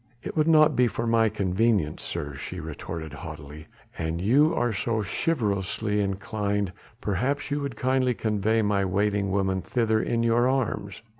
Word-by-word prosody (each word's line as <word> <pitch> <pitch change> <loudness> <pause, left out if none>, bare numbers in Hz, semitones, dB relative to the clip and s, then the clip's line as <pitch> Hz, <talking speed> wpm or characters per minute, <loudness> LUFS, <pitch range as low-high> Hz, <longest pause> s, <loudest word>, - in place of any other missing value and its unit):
"It - - -6
would 155 -1 +2
not 155 -2 +5
be 125 0 +4
for 115 - -3
my 115 -1 +3
convenience, 100 -4 +1
sir," 75 -4 -4
she 85 +7 -6
retorted 80 0 -6
haughtily, 75 0 -9 0.3
"an 80 0 -2
you 130 - +4
are 120 -1 +1
so 110 +2 -1
chivalrously 105 - -1
inclined 100 -1 -2 0.3
perhaps 130 +9 -1
you 145 - 0
would 140 -4 -4
kindly 130 0 +1
convey 110 +1 +1
my 100 -1 +1
waiting 100 +1 0
woman 95 -1 0
thither 110 +1 +1
in 115 0 0
your 120 +2 +3
arms." 110 -6 -2
105 Hz, 155 wpm, -26 LUFS, 95-120 Hz, 0.3 s, not